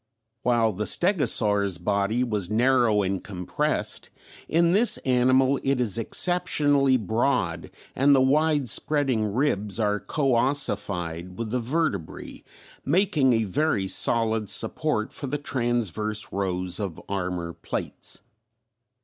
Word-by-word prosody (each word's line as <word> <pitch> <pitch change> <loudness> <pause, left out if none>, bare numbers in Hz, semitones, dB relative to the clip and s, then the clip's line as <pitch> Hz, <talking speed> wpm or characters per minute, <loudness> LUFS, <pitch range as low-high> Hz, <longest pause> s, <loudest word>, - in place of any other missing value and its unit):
While 115 -3 +1
the 105 +3 -3
stegosaur's 105 - +2
body 100 +6 0
was 105 -7 -2
narrow 115 -2 +2
and 95 0 -3
compressed, 90 -3 -3 0.4
in 170 +1 +2
this 220 +6 +4
animal 130 +1 +3
it 135 -1 0
is 115 -2 +1
exceptionally 145 -2 +2
broad 110 -6 -1 0.3
and 140 +2 +4
the - - +4
wide 145 +1 +2
spreading 125 -4 +1
ribs 105 -4 -1
are 105 -1 0
coössified 105 - -1
with 110 +1 -5
the 125 - 0
vertebrae, 120 - -3 0.4
making 150 -5 +2
a 115 -1 +1
very 105 -1 0
solid 110 0 +1
support 135 -9 0
for 140 - -5
the 150 - -2
transverse 115 - -2
rows 90 -2 -3
of 95 -6 -5
armor 90 -3 -3
plates. - - -7
115 Hz, 115 wpm, -25 LUFS, 100-140 Hz, 0.4 s, this